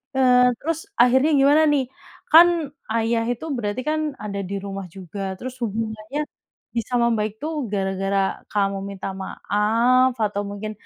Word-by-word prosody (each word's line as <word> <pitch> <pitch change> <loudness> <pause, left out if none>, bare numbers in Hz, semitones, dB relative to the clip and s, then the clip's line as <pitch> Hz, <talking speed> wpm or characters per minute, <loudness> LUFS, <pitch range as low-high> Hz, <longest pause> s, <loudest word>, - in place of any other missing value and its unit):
eee, 250 -1 +5
terus 325 +1 -2 0.2
akhirnya 260 +5 +4
gimana 285 +3 +5
nih? 275 - +2 0.5
Kan 335 +2 +9 0.5
ayah 230 0 +1
itu 245 +6 -5
berarti 215 +2 -2
kan 310 - 0 0.2
ada 200 -1 -4
di 200 - -4
rumah 195 -1 -5
juga, 190 +1 -9 0.2
terus 255 +3 -7
hubungannya 220 +4 -3 0.6
bisa 230 +2 -3
membaik 220 -3 +1
tuh 315 +2 -3 0.2
gara-gara 195 0 -1 0.3
kamu 200 -1 0
minta 195 -1 -6
maaf 230 +7 +2
atau 205 -1 -2
mungkin 205 +1 -5
225 Hz, 140 wpm, -23 LUFS, 200-255 Hz, 0.6 s, Kan